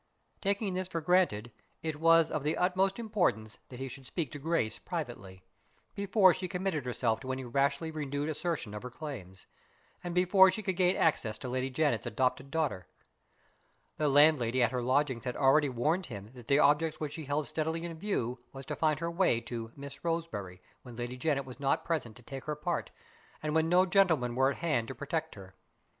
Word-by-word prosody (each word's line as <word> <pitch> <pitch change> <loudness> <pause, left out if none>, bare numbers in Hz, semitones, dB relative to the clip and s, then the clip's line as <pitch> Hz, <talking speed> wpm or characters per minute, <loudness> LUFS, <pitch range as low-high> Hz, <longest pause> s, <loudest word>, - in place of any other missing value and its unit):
Taking 200 0 0
this 185 0 -2
for 170 -2 -3
granted, 155 - +2 0.3
it 160 -2 -2
was 165 +1 +5
of 155 - -1
the 150 +3 -1
utmost 190 +2 +2
importance 180 - -1
that 125 - -9
he 135 - -3
should 130 0 -9
speak 155 -6 -3
to 145 - -7
Grace 145 -8 0
privately, 95 -1 -6 0.5
before 200 -2 +4
she 185 - -4
committed 180 -6 -2
herself 115 -2 0
to 130 +1 -5
any 130 0 -3
rashly 140 +5 0
renewed 145 -1 -3
assertion 155 - -2
of 105 - -5
her 125 - -6
claims, 120 - -8 0.6
and 175 -1 -4
before 190 +1 +6
she 215 +3 -2
could 190 -3 -1
gain 180 +1 +3
access 115 -9 +1
to 125 - -6
Lady 130 +1 -1
Janet's 135 -5 0
adopted 130 +4 0
daughter. 145 - -1 1.1
The 150 -1 +2
landlady 135 -4 +5
at - - +2
her 125 -1 -1
lodgings 130 -1 +1
had 125 - -3
already 140 +2 +4
warned 155 +9 0
him 105 -2 -8
that 120 -3 -13
the 140 - +4
object 150 +2 +3
which 150 -2 -4
she 155 -1 -6
held 145 +1 -1
steadily 160 +2 -2
in 165 -2 -7
view 125 - -2
was 135 0 -9
to 150 - -4
find 155 -1 +1
her 170 0 -1
way 170 -9 +2
to 115 -1 -6
"Miss 140 0 -9
Roseberry" 110 - -3 0.2
when 125 -2 -11
Lady 120 +1 -4
Janet 140 0 0
was 130 0 -10
not 140 -1 0
present 145 -10 -2
to 120 - -16
take 135 +2 -8
her 150 - -2
part, 170 +4 -2 0.5
and 150 -1 -1
when 160 0 +2
no 180 +2 +5
gentleman 175 -10 +3
were 130 +2 +3
at 140 - -3
hand 150 -9 0
to 135 - -6
protect 155 +5 -3
her. 95 -2 -12
145 Hz, 200 wpm, -31 LUFS, 125-165 Hz, 1.1 s, before